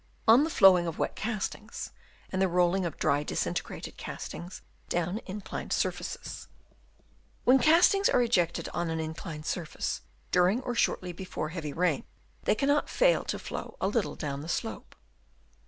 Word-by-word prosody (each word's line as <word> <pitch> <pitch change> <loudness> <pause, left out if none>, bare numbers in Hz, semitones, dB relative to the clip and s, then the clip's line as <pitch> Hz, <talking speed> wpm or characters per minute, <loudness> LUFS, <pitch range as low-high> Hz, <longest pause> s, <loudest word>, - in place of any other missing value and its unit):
On 235 +6 +8
the 320 - 0
flowing 185 - +6
of 165 - -4
wet - - -1
castings, 215 0 -4 0.4
and 190 - -1
the 190 - +4
rolling 180 +1 +2
of 165 - -7
dry 145 +1 +2
disintegrated 150 - -3
eastings 175 +2 -7 0.3
down 175 +4 0
inclined 200 +1 -6
surfaces, - - -2 0.4
— - - -35
When 260 +2 +7
castings 350 +8 +5
are - - +4
ejected 180 -8 +1
on 170 -1 -2
an 160 0 -2
inclined 160 -1 -5
surface 170 -3 -3 0.3
during 180 +6 +4
or 245 - -2
shortly 180 -6 0
before 180 -3 -4
heavy 160 -3 -4
rain, 165 -2 +1 0.4
they - - +3
cannot 285 +5 +2
fail - - +3
to - - -2
flow - - -6
a 190 - +1
little 210 +1 0
down 140 -3 -4
the 160 - -7
slope. 225 +5 -4
185 Hz, 155 wpm, -29 LUFS, 165-230 Hz, 0.4 s, On